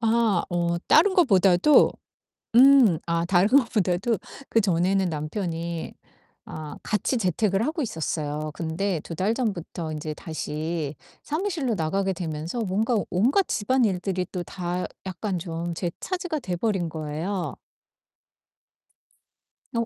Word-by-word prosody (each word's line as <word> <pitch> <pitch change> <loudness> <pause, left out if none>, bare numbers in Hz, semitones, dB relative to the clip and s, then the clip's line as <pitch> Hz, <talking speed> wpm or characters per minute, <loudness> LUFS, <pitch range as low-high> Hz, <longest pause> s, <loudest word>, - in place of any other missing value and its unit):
아 225 -5 +2
어 170 -1 0
다른 375 +5 +5
것보다도 195 - +5 0.6
음 255 - +7
아 170 0 0
다른 180 +2 +3
것보다도 220 -5 +2 0.3
그전에는 190 -2 +2
남편이 165 +1 -4 0.5
아 155 -1 -8
같이 215 +4 0
재택을 195 +2 +1
하고 310 +3 -2
있었어요. 155 - -3
근데 165 +3 -2
2 165 - -8
달 190 +7 +1
전부터 175 -8 -3
인제 155 0 -4
다시 155 -1 -4 0.3
사무실로 310 - -1
나가게 195 +3 0
되면서 165 +4 -4
뭔가 220 +3 0
온갖 255 - +3
집안일들이 200 -6 0
또 180 - -3
다 180 0 -4 0.2
약간 190 +1 -3
좀 170 0 -4
제 175 0 -2
차지가 355 -4 -3
돼 185 -8 -3
버린 190 -3 0
거예요. 160 +4 -3 2.2
어 230 -2 0
185 Hz, 240 characters per minute, -25 LUFS, 165-225 Hz, 2.2 s, 음